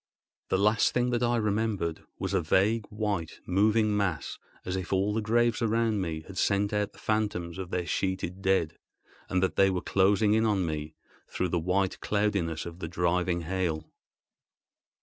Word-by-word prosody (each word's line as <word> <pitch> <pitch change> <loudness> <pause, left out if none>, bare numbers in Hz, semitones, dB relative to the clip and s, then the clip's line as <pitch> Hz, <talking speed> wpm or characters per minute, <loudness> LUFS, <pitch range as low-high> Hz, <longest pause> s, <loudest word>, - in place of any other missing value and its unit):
The - - +2
last 105 +3 +3
sight 125 0 +2
that 120 0 0
I 120 0 +2
remembered 105 -6 -1
was - - -3
a 95 - +2
vague, 105 +7 +2
white, 105 -6 -3
moving 105 +3 +3
mass, 95 -6 -2 0.3
as 90 - -2
if 95 -2 -4
all 100 +2 +1
the 110 - 0
graves 120 +2 +2
around 115 -2 +1
me 80 -3 -3
had 95 - -6
sent 100 0 +1
out 105 0 -1
the - - -19
phantoms 100 -5 -2
of 95 -2 -5
their 90 -1 -2
sheeted 95 +2 -2
dead, 95 -5 +1 0.5
and 95 0 +1
that 95 - 0
they 95 0 +5
were 95 -1 0
closing 100 +3 +3
in 110 +1 +3
on 100 -5 +2
me 75 -1 -4 0.3
through 90 - -2
the 85 - 0
white 95 +3 0
cloudiness 100 -6 0
of 85 0 -8
the 80 - -4
driving 85 +1 0
hail. 85 -2 -2
95 Hz, 175 wpm, -28 LUFS, 90-105 Hz, 0.5 s, they